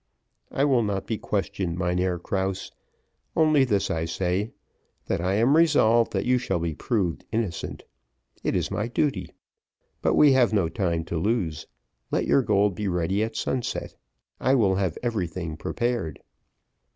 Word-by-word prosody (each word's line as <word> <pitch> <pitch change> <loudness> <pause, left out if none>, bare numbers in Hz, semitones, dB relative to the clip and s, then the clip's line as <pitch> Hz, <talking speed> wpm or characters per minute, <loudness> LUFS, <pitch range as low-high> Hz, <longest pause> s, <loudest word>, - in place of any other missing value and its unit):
"I 140 - +1
will 130 -4 +3
not 100 -3 -2
be 110 0 -3
questioned, 95 -3 -2
Mynheer 90 0 0
Krause; 95 +2 -3 0.6
only 155 -3 +4
this 105 -6 +1
I 80 0 -1
say, 95 +5 -1 0.5
that - - -1
I 95 +2 +1
am 120 +7 +4
resolved 120 -8 +4
that - - 0
you 125 0 +3
shall 95 -7 -1
be 85 -1 -2
proved 90 0 -1
innocent. 110 -7 -3 0.6
It - - 0
is - - -1
my 105 - -1
duty. 115 - -1 0.7
But - - +2
we 150 -2 +7
have 125 -4 +4
no 95 -6 +2
time 85 -2 -1
to 85 -1 -2
lose. 90 -6 -1 0.4
Let - - 0
your 140 - +4
gold 105 -4 +2
be 105 +3 -3
ready 90 +2 0
at 110 0 -4
sunset: 125 +2 -2 0.5
I 130 - +3
will 105 -7 +3
have 95 -5 -1
everything 90 -8 -2
prepared." 120 -3 -2
100 Hz, 155 wpm, -25 LUFS, 90-120 Hz, 0.7 s, we